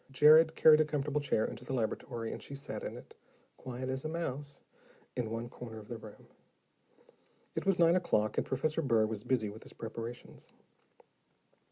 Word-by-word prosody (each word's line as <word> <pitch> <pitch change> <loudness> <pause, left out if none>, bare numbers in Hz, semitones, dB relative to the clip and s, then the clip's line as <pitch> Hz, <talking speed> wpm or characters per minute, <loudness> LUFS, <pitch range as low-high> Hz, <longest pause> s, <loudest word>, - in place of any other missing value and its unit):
Jared 155 +4 +7
carried 155 -1 +7
a - - +3
comfortable 150 -1 -1
chair 110 -6 +1
into 120 - -6
the 130 - -5
laboratory 115 0 -2
and - - -7
she 140 - -8
sat 140 - -6
in - - -5
it, - - -13 0.4
quiet 130 0 -6
as 130 0 -3
a 155 - -3
mouse, 145 -3 -4 0.5
in 120 -3 -2
one 115 +1 -3
corner 120 -2 -9
of 105 -1 -11
the 115 - -5
room. 110 -1 -12 1.3
It - - -3
was 195 -2 +4
nine 170 0 +5
o'clock, 110 - +1
and - - 0
Professor 155 +5 0
Burr 115 -7 +3
was 110 -1 -4
busy 110 -6 0
with 110 +2 -11
his - - -12
preparations. 115 +1 -8
130 Hz, 180 wpm, -32 LUFS, 115-150 Hz, 1.3 s, Jared